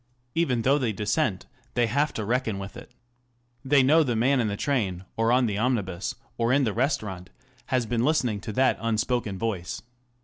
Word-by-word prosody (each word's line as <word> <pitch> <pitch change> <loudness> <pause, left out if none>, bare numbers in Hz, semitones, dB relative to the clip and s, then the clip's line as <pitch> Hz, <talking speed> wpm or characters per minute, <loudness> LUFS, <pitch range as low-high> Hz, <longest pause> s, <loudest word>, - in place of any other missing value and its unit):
Even 130 -9 +1
though 140 +4 +4
they 120 -5 0
dissent, 105 -2 -1 0.3
they 120 -1 +3
have 140 +7 +1
to 110 - -3
reckon 115 -2 0
with 95 0 -7
it. - - -11 0.7
They 135 0 +4
know 155 +5 +5
the 125 -6 0
man 130 +4 +3
in 115 - +1
the 100 -1 -2
train 100 -11 -1
or 115 +1 +2
on 125 0 +4
the 105 -3 -1
omnibus, 105 -7 -1 0.2
or 115 +1 +2
in 140 +2 +4
the 110 -5 0
restaurant, 110 - -2 0.4
has 125 -2 +1
been 115 0 0
listening 125 -8 +1
to 110 - -5
that 130 +4 +2
unspoken 115 -2 0
voice. 95 -5 -3
115 Hz, 190 wpm, -26 LUFS, 105-130 Hz, 0.7 s, know